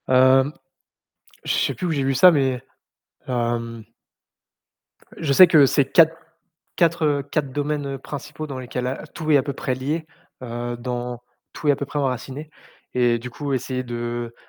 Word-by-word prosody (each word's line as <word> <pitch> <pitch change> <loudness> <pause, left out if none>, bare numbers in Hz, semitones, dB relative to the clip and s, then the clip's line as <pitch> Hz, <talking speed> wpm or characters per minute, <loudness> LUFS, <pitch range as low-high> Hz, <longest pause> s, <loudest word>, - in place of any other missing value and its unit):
Hem, 130 +2 +5 0.9
je - - 0
sais - - +1
plus 180 - -4
où - - -1
j'ai 140 -3 0
vu 135 0 +1
ça, 180 +8 +8
mais 135 -5 +1 0.6
hem 115 -2 -2 1.3
Je 150 -4 0
sais 185 +6 +9
que 155 -4 +6
c'est 135 0 +1
4 165 -1 +6 0.6
4, 170 -1 +2
heu, 145 -1 +1
4 140 0 -2
domaines 145 -1 -2
principaux 145 +3 -7
dans 135 -3 -6
lesquels 125 0 -4
a 135 +4 -4
tout 155 0 -5
est 150 - +6
à 135 - +4
peu 140 - -3
près 130 -1 -2
lié, 150 +5 -3 0.4
heu, 120 0 -4
dans 120 0 -4 0.3
tout 150 - -4
est - - +7
à - - -1
peu 140 - -4
près 145 - -4
enraciné 135 +2 -3 0.4
et 120 -1 +3
du 125 +2 -8
coup, 140 +3 -4
essayer 130 0 -2
de 120 -1 -4
135 Hz, 175 wpm, -22 LUFS, 125-145 Hz, 1.3 s, sais